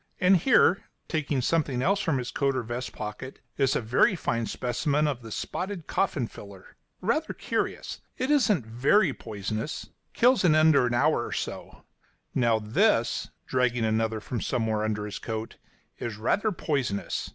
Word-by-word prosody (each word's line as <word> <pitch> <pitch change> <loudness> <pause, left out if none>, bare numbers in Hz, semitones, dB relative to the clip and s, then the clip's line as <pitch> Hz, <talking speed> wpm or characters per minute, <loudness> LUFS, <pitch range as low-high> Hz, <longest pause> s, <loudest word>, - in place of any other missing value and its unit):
And 185 +1 +5
here," 195 -1 +4 0.2
taking 145 -4 -1
something 140 -5 +1
else 195 +5 +2
from 165 -8 0
his 125 -1 -4
coat 140 -1 0
or 130 - -1
vest 120 +2 -4
pocket, 105 +5 -7 0.2
"is 135 -2 +2
a - - +1
very 125 - +3
fine 115 -8 -1
specimen 145 +5 0
of 135 -4 -2
the 115 -1 -10
spotted 185 - -4
coffin 150 -10 0
filler, 100 -4 -12 0.3
rather 290 - 0
curious. - - -3 0.2
It 260 +3 -1
isn't 215 - +3
very 135 - +3
poisonous 110 +4 -5 0.2
kills 245 -1 +4
in 160 -4 +5
an 155 -1 +5 0.2
hour 135 -1 +2
or - - -8
so. - - -5 0.5
Now, 120 -3 +3
this," 115 - +1 0.2
dragging 125 -2 +1
another 110 0 0
from 115 +2 -4
somewhere 110 -4 0
under 105 -1 -1
his 105 - -6
coat, 110 0 -5 0.4
"is 115 -3 -4
rather 205 - +1
poisonous. 140 - -2
130 Hz, 155 wpm, -27 LUFS, 110-165 Hz, 0.5 s, And